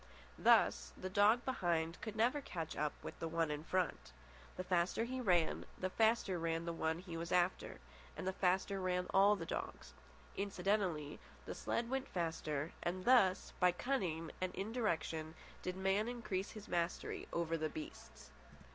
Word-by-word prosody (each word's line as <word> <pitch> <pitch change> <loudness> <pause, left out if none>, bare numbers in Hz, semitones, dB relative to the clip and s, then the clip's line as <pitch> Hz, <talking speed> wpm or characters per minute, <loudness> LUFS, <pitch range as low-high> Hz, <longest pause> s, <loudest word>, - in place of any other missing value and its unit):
Thus, - - +4
the 185 0 -5
dog 210 +5 +4
behind 170 -9 0
could 220 -2 -5
never 245 +6 +2
catch 165 - -5
up 150 0 0
with - - -7
the 165 - -2
one 165 -1 0
in 150 0 -3
front. 185 +1 -1 0.4
The 185 - -2
faster 180 +3 +1
he 255 +2 -3
ran, 175 -7 +2
the 185 0 -2
faster 220 -5 +2
ran 165 0 -1
the 170 - -2
one 160 0 0
he 175 -1 -7
was 165 +1 -4
after, 180 0 +1 0.4
and - - -4
the 190 - 0
faster 190 +1 +1
ran 180 -1 0
all 200 +2 +6
the 170 -5 -5
dogs. 65 - -5 0.4
Incidentally, 190 -6 -1 0.3
the - - -4
sled 235 - -1
went 265 +1 -2
faster, 160 -3 -2
and 185 +1 -2
thus, 230 -8 +4
by 180 -1 +5
cunning 175 -7 -1
indirection, 180 -5 -2 0.3
did 180 0 -3
man 195 +3 +1
increase 230 -6 -3
his 215 -2 -9
mastery 170 0 -2
over 165 -1 0
the 155 -1 -1
beasts. 315 +1 -9
185 Hz, 160 wpm, -37 LUFS, 165-205 Hz, 0.4 s, all